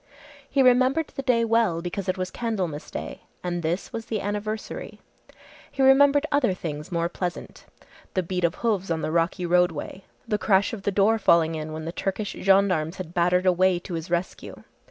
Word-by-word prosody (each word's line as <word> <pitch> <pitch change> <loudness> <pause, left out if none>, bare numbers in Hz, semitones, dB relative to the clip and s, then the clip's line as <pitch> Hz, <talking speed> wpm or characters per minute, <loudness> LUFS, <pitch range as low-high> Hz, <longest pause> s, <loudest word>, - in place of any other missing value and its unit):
He 275 -1 +3
remembered 255 +5 +3
the 275 - -6
day 240 -3 +2
well 225 -7 +2
because 185 +3 -4
it 185 - 0
was 185 0 -3
Candlemas 190 -10 -3
day, - - -6 0.2
and 175 -1 -2
this 170 +4 -3
was 225 0 -5
the 220 - -2
anniversary. 210 +2 -5 0.7
He 270 - 0
remembered 285 +2 +5
other 255 -10 +2
things 150 -3 -6
more 170 -1 0
pleasant. 175 0 -6 0.5
The 185 - +1
beat 180 +1 -3
of 170 -1 +2
hoofs 200 -5 0
on 165 -1 -1
the - - -1
rocky 170 +2 0
roadway, 180 +1 0 0.2
the 210 - 0
crash 190 +2 +2
of 220 - -5
the 200 - -1
door 210 +3 +3
falling 165 -4 +4
in 155 0 -5
when 155 0 -6
the 165 - -3
Turkish 195 +3 -3
Gendarmes 190 -4 +2
had 175 -2 -7
battered 180 +1 +2
a 185 - +5
way 185 0 +3
to 175 +1 -8
his 165 +1 -5
rescue. 175 +1 -4
185 Hz, 190 wpm, -25 LUFS, 170-220 Hz, 0.7 s, remembered